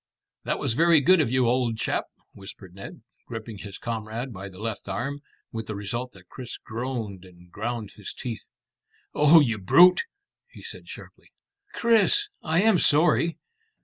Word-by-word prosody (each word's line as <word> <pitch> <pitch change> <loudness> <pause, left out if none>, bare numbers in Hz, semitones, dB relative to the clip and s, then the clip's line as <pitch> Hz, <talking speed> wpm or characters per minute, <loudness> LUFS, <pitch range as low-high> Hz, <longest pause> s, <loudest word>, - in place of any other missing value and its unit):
"That - - -1
was - - -1
very 165 +4 +5
good 180 +5 +5
of 135 - 0
you, 130 -1 +2
old 120 -2 +1
chap," - - -1 0.3
whispered 95 -2 -12
Ned, 95 +1 -10 0.2
gripping 115 -2 -7
his 100 -1 -8
comrade 115 +2 -5
by 95 +1 -8
the 95 - -14
left 110 -1 -5
arm, 135 +8 -3 0.3
with 110 -1 -5
the 110 - -4
result 115 +5 -5
that 90 -2 -17
Chris 125 +3 -8
groaned 115 -5 -5
and 90 -1 -17
ground 110 +1 -4
his 105 - -7
teeth. 120 -3 -7 0.7
"Oh, 150 +2 +7
you 115 -6 0
brute!" 180 - +6 0.4
he - - -14
said - - -9
sharply. - - -12 0.5
"Chris! 235 - +3
I 165 +3 +1
am 220 -5 +4
sorry." 165 +2 +3
115 Hz, 160 wpm, -25 LUFS, 100-145 Hz, 0.7 s, Oh